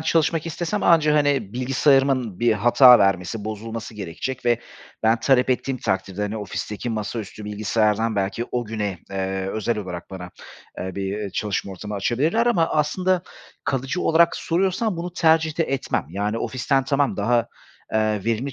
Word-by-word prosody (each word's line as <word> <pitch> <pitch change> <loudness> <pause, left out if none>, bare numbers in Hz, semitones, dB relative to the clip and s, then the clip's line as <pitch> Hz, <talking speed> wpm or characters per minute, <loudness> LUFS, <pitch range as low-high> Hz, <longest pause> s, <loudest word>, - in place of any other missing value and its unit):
çalışmak 160 0 +1
istesem 175 +5 -3
anca, 155 -3 +4
hani, 140 -8 +1
bilgisayarımın 130 -3 +2
bir 120 -1 +4
hata 120 +3 +7
vermesi, 100 +2 0
bozulması 110 +1 -6
gerekecek 105 +7 -5
ve 120 -1 +3 0.4
ben 115 +1 +3
talep 130 0 +3
ettiğim 130 +1 0
takdirde, 95 0 -2
hani, 105 +2 -2
ofisteki 105 +2 -4
masaüstü 110 -1 -5
bilgisayardan 105 +1 0
belki 100 +4 -1
o 125 -1 -1
güne, 105 -4 -3
eee, 95 0 -2
özel 110 +2 -1
olarak 90 -3 -6
bana, 90 -2 -8 0.5
eee, 95 0 -5
bir, 100 +1 -3
eee, 105 -2 -4
çalışma 100 0 -2
ortamı 105 +3 -7
açabilirler 140 - +1
ama 175 -9 +3
aslında 180 +4 +1 0.4
kalıcı 135 +6 -1
olarak 170 +1 +4
soruyorsan 190 +4 0
bunu 175 +1 -5
tercih 160 -2 +2
de 165 - +3
etmem. 135 - -2
Yani, 105 +5 -2
ofisten 130 +3 0
tamam, 140 0 +1
daha, 115 +3 +1 0.5
eee, 110 -2 +1
verimli 115 +4 -1
115 Hz, 150 wpm, -23 LUFS, 105-145 Hz, 0.5 s, hata